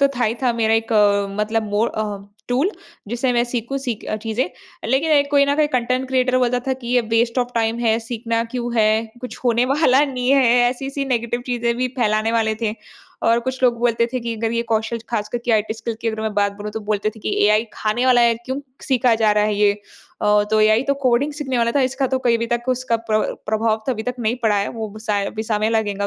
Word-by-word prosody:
तो 280 - +5
था 240 - +2
ही 220 +2 0
था 245 -2 +3
मेरा 225 -1 +1
एक 225 0 -1
अ, 205 -1 +3
मतलब 220 0 -1
मोर 210 +3 +1
अ, 210 -2 -2 0.3
टूल 270 +10 +1 0.4
जिसे 245 +2 0
मैं 240 0 +2
सीखूँ 245 +2 -3
सीख 245 -5 -4
अ, 215 - -1
चीज़ें, 220 +1 -2 0.4
लेकिन 275 +6 +1
एक 285 -1 +3
कोई 280 -1 +5
ना 280 0 +1
कोई 305 -1 +3
कंटेंट 255 +2 -1
क्रिएटर 255 -1 +2
बोलता 250 0 +1
था - - +2
कि 235 - -7
ये 250 - +5 0.2
वेस्ट 235 +2 +1
ऑफ 245 0 0
टाइम 225 0 0
है, 225 -1 +2
सीखना 230 0 -2
क्यों 240 0 -4
है, 220 0 +3 0.2
कुछ 250 - -7
होने 240 0 +3
वाला 290 -2 +4
नहीं 255 -2 -2
है 275 -1 +5 0.3
ऐसी-ऐसी 275 +2 -4
नेगेटिव 240 -2 -1
चीज़ें 235 -1 0
भी 255 +1 0
फैलाने 215 0 +1
वाले 220 -1 +1
थे 215 -1 0 0.5
और 230 +1 +4
कुछ 260 0 -4
लोग 240 -2 +3
बोलते 235 -1 +2
थे 255 - -1
कि 230 -1 -3
अगर 225 +1 -2
ये 235 0 0
कौशल, 225 0 -1
ख़ास 215 -2 -2
करके 240 +1 -3
आईटी 220 0 +1
स्किल 225 +1 -5
की 230 - -1
अगर 220 0 -3
मैं 220 - -2
बात 205 -1 +1
बोलूँ, 210 0 -6
तो 220 - -4
बोलते 210 0 -1
थे 220 - -14
कि - - -2
एआई 215 +2 +3
खाने 230 +4 -1
वाला 250 -1 +5
है, 235 -1 +4
क्यों 260 +3 -3 0.2
सीखा 250 -3 +2
जा 220 -1 +3
रहा 210 0 +2
है 210 -1 0
ये? 205 0 +3 0.5
अ, 210 0 +4
तो 215 0 +3
एआई 215 +2 +4
तो 280 +1 0
कोडिंग 255 +4 +2
सीखने 265 -4 -3
वाला 235 0 +2
था, 280 - +2
इसका 265 +1 0
तो 260 - +2
कहीं 240 -2 +2
भी 230 - -2
तक 240 0 0
उसका 255 -2 0
प्र 215 - +4 0.3
प्रभाव 220 0 0
तो 260 - +1
अभी 220 -1 -4
तक 250 +1 -3
नहीं 230 +2 0
पड़ा 215 -2 +3
है, 200 0 0
वो 215 -2 -6
साय 210 -2 -1
अभी 220 - -4
समय 215 -1 -1
में 215 +1 +1
लगेगा 205 -2 -2
235 Hz, 245 wpm, -20 LUFS, 220-250 Hz, 0.5 s, तो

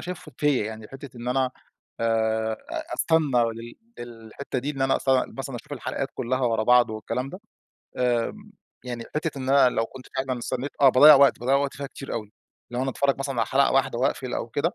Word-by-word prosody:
شايفه 170 -4 -8
فيَّ 145 -3 +2
يعني 110 0 -7
حتة 135 -1 -11
إن 120 +1 -5
أنا 130 0 +1 0.5
آآ 110 -1 +1 0.2
أ - - -5
أستنى 145 -7 +2
لل 115 +1 -10 0.3
للحتة 120 +3 -7
دي 140 +4 -3
إن 135 -2 -3
أنا 135 - +3
أستنى 130 -1 +1
مثلًا 135 -2 -4
أشوف 115 - -11
الحلقات - - -3
كلها 130 +2 -2
ورا 115 -3 +1
بعض 125 0 +5
والكلام 110 +4 -4
ده، 185 - -9 0.6
آمم، 125 - -1 0.3
يعني 120 -2 -5
حتة 150 -1 -2
إن 130 0 -5
أنا 135 -2 +6
لو 115 - +1
كنت 130 -1 -12
فعلًا 130 -1 -1
استنيت 130 +3 -3
آه 140 - +8
باضَّيع 145 +4 +9
وقت، 140 0 +5
باضَّيع 130 +3 +2
وقت 140 0 -1
فيها 140 0 -5
كتير 135 0 -9
أوي. 105 -1 -5 0.4
لو 125 +1 -2
أنا 135 - -1
اتفرج 140 +1 0
مثلًا 135 -2 -3
على 115 - +2
حلقة 140 +1 +3
واحدة 135 -3 +1
واقفل 130 0 -1
أو - - -3
كده، 145 +8 -1
130 Hz, 205 wpm, -25 LUFS, 120-140 Hz, 0.6 s, باضَّيع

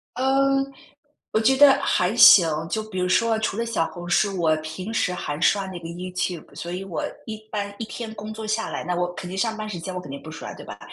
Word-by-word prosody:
嗯， 270 +1 +2 0.7
我 220 - +2
觉 225 +5 +4
得 275 0 +8
还 185 +4 +1
行。 185 -7 +9 0.2
就 220 +3 -1
比 215 -3 -8
如 180 - +1
说 225 +4 +2
除 215 -2 -2
了 230 - -1
小 225 -8 0
红 175 -1 -9
书， 195 +1 +2
我 160 -2 +3
平 155 +7 -6
时 180 -5 +1
还 150 -4 -4
刷 200 +2 +3
那 185 -2 -7
个 165 - -8
YouTube， 180 -1 -4
所 170 - -6
以 180 +2 -4
我 190 -4 -4 0.2
一 220 -1 -5
般 200 -1 -3
一 225 - -4
天 225 0 -7
工 215 +1 -7
作 220 0 -7
下 220 +1 -1
来 - - -4
那 180 - -2
我 175 0 -1
肯 180 - -7
定 190 - -6
上 220 +2 0
班 215 0 -5
时 180 -5 -5
间， 185 +3 -6
我 180 - -3
肯 145 - -11
定 140 - -7
不 155 - -10
刷， 160 - -7
对 - - -11
吧？ - - -9
195 Hz, 300 characters per minute, -24 LUFS, 175-220 Hz, 0.7 s, 行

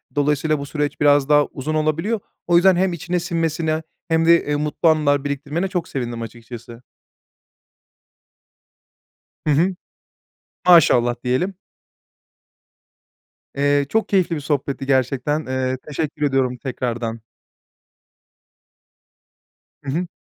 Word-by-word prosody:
Dolayısıyla 150 +1 +1
bu 140 - -5
süreç 150 0 -3
biraz 145 -1 +4
daha 145 -1 +5
uzun 150 +3 -5
olabiliyor. 160 +9 0 0.3
O 175 - +3
yüzden 185 +2 +6
hem 185 0 +1
içine 180 +1 -2
sinmesine 165 -2 -1 0.2
hem 165 0 +2
de, 170 0 +5
eee, 145 - -1
mutlu 150 +3 +1
anılar 145 -3 +2
biriktirmene 145 +5 -2
çok 180 -3 -3
sevindim 120 -3 -4
açıkçası. 120 +1 -10 2.6
Hı - - +4
hı. 180 +6 +2 0.9
Maşallah 125 -9 +6
diyelim. 130 +11 0 2.0
Eee, 145 0 +2
çok 220 0 0
keyifli 185 -4 +2
bir 150 - -4
sohbetti 140 -2 -2
gerçekten, 135 +3 0
eee, 130 0 -1
teşekkür 150 +1 -4
ediyorum 130 -2 0
tekrardan. 120 -3 -4 2.6
Hı 135 - -4
hı. 175 +5 -2
145 Hz, 110 wpm, -21 LUFS, 135-165 Hz, 2.6 s, yüzden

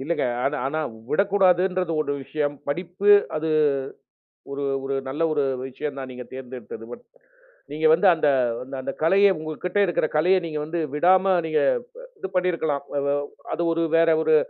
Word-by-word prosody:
இல்லங்க. 150 +1 -1 0.2
ஆனா, 145 +2 0
ஆனா 155 +3 -2 0.3
விடக்கூடாதுன்றது 185 -1 +2
ஒரு 145 - -3
விஷயம், 145 0 -2
படிப்பு 180 +6 0 0.3
அது 160 +1 -2 1.0
ஒரு 140 +1 -4 0.2
ஒரு 135 0 -2
நல்ல 145 +5 -4
ஒரு 145 -2 +1 0.3
விஷயம் 140 +2 -5
தான் 130 -1 -6
நீங்க 125 0 -8
தேர்ந்தெடுத்தது. 125 -3 -8
பட், - - -9 0.7
நீங்க 155 +2 -2
வந்து 180 +4 +4
அந்த, 155 - +1 0.4
அந்த, 135 +2 -8
அந்த 135 - -4
கலைய 195 +4 +5
உங்கக்கிட்ட 155 +5 -3
இருக்கிற 175 -3 0
கலைய 180 +5 +4
நீங்க 155 -2 -4
வந்து 165 +1 -3
விடாம 185 +4 +4
நீங்க, 155 - +1 0.4
ப - - -11
இது 190 - -5
பண்ணியிருக்கலாம். 170 -6 0 0.2
அதா 140 0 0 0.4
அது - - -3
ஒரு 165 - 0
வேற 165 0 +4
ஒரு, 160 0 +3
160 Hz, 155 wpm, -24 LUFS, 145-180 Hz, 1.0 s, கலைய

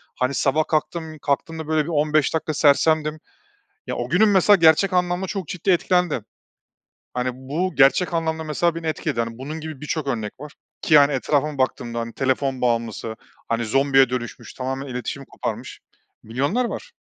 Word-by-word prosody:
Hani, 130 +2 0
sabah 145 +3 +1
kalktım 155 0 -2
kalktığımda 160 +2 -2
böyle, 155 +1 0
15 150 -1 +2
dakika 160 -1 -1
sersemdim. 155 +1 +3 0.7
Ya, - - -3
o 120 - -3
günüm 200 +9 +4
mesela 200 +1 +6
gerçek 165 +3 +4
anlamda 180 +1 +1
çok 190 -3 -5
ciddi 180 +2 -2
etkilendi. 180 - +2 0.9
Hani, 125 0 0
bu 150 +8 -3
gerçek 145 +6 +4
anlamda 160 -1 -1
mesela 160 +2 0
beni 165 0 -6
etkiledi, 155 -5 -1
hani, 115 0 -4
bunun 150 +5 -6
gibi 155 -3 -7
birçok 150 0 -3
örnek 110 -5 -2
var 150 0 -9 0.3
ki 155 - +2
yani, 145 -1 +7
etrafıma 145 +3 0
baktığımda, 120 -2 -1
hani, 115 0 -5
telefon 135 0 0
bağımlısı, 115 -2 -1 0.3
hani, 115 0 0
zombiye 135 +2 +3
dönüşmüş, 125 -2 -5
tamamen 135 +1 -4
iletişimi 130 +2 -5
koparmış - - -6 0.4
milyonlar 140 - 0
var. 485 - -7
150 Hz, 160 wpm, -22 LUFS, 130-160 Hz, 0.9 s, yani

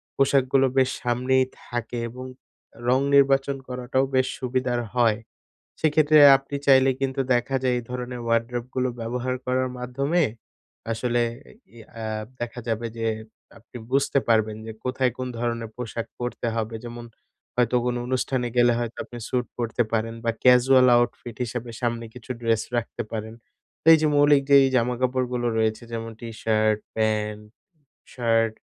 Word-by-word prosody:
পোশাকগুলো 135 -1 +3
বেশ 130 -1 +4
সামনেই 130 +2 +2 0.2
থাকে 120 0 -4
এবং 125 +2 -9 0.6
রং 130 +1 +4 0.2
নির্বাচন 135 0 +3
করাটাও 125 +1 -1
বেশ 130 0 +3
সুবিধার 125 -1 -1 0.2
হয়। 115 -3 +3 0.6
সেক্ষেত্রে 155 0 +4 0.2
আপনি 135 +1 -6
চাইলে 135 -1 +6
কিন্তু 135 0 -1
দেখা 120 +2 0
যায়, 125 -1 +2
এই - - -5
ধরনের 125 0 -5
ওয়ারড্রোবগুলো 120 +2 -1
ব্যবহার 125 +2 -2
করার 130 0 +1
মাধ্যমে 140 +7 0 0.7
আসলে 120 +1 0 0.3
এ - - -15 0.2
ই - - -12 0.2
আ - - -4 0.4
দেখা 120 +1 -5
যাবে 115 +1 -1
যে 115 - -1 0.5
আপনি 115 +2 -14
বুঝতে 140 +1 +2
পারবেন 110 -1 +2
যে 110 - -6
কোথায় 125 -1 0
কোন 130 - -3
ধরনের 115 -1 -2
পোশাক 115 -1 -5
পরতে 120 -1 -4
হবে। 115 0 -2
যেমন 120 0 -7 0.5
হয়তো 125 0 +2
কোনো 125 0 0
অনুষ্ঠানে 130 -1 -1
গেলে 120 0 +5
হয়তো 120 -1 -4
আপনি 120 - -10
স্যুট 125 -1 -1
পরতে 120 0 0
পারেন 115 0 -1
বা 115 - +2
ক্যাজুয়াল 125 +1 +6
আউটফিট 120 -1 -1
হিসাবে 120 +1 -5
সামনে 120 -1 -1
কিছু 125 0 -13
ড্রেস 115 -2 +1
রাখতে 120 0 -3
পারেন। 110 0 -5 0.5
তো - - -32
এই 160 - +7
যে - - +4
মৌলিক 145 -1 +5
যেই 140 -1 +8
জামাকাপড়গুলো 125 0 0
রয়েছে 110 +1 0
যেমন 115 0 -4
টি 120 - -7
শার্ট, 110 -1 +2 0.2
প্যান্ট, 105 -1 -1 0.7
শার্ট 115 -2 +1
125 Hz, 150 wpm, -24 LUFS, 115-130 Hz, 0.7 s, যেই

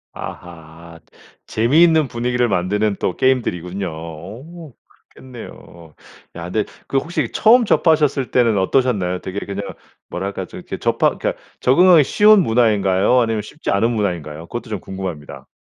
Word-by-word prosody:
아하. 85 -1 -10 0.5
재미있는 155 +6 +3
분위기를 125 0 -1
만드는 105 +2 0
또 90 - -2
게임들이군요. 95 -8 -1
오 105 - -10 0.4
그렇겠네요. 85 -10 -13 0.4
야 85 - -7
근데 110 +1 0 0.2
그 135 - -1
혹시 165 +5 -2
처음 235 +2 +4
접하셨을 150 - +2
때는 115 -4 +2
어떠셨나요? 95 -4 0
되게 95 +2 -5
그냥 100 0 -5 0.5
뭐랄까 100 +1 -4
좀 - - -11
이렇게 - - -7
접하 - - +1
그러니까 - - -2 0.3
적응하기 170 +4 +5
쉬운 210 +8 +5
문화인가요, 110 - +2
아니면 115 -2 -1
쉽지 110 +9 -6
않은 105 +4 +2
문화인가요? 85 -8 -3
그것도 120 +3 -7
좀 105 -3 -4
궁금합니다. 90 -6 -8
110 Hz, 360 characters per minute, -19 LUFS, 90-130 Hz, 0.5 s, 적응하기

